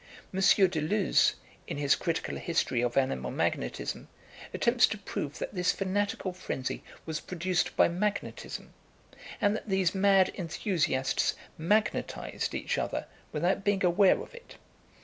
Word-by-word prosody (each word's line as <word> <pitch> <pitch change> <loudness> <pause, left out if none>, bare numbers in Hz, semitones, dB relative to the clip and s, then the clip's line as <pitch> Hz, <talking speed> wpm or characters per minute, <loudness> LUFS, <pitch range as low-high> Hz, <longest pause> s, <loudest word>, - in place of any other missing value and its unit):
M. 190 - -2
Deleuze, 190 0 +3 0.3
in - - -4
his 145 -1 +3
critical 165 -1 -2
history 155 -7 0
of 120 +1 -1
Animal 65 - +1
Magnetism, - - -2 0.4
attempts 240 +1 +4
to 215 - -4
prove 150 -7 -5
that - - -5
this 180 -2 +2
fanatical 195 -1 -1
frenzy 155 -7 -4 0.2
was 160 -1 -3
produced 180 0 -1
by - - +6
magnetism, 200 +5 -3 0.7
and 205 +1 +2
that 220 - -6
these 190 -3 +2
mad 195 -1 +4
enthusiasts 165 -7 0 0.2
magnetised 205 +7 -1
each - - -1
other - - -2 0.3
without 175 +6 0
being 195 -2 +2
aware 185 +2 +5
of - - -14
it. 485 0 -13
185 Hz, 130 wpm, -29 LUFS, 155-200 Hz, 0.7 s, by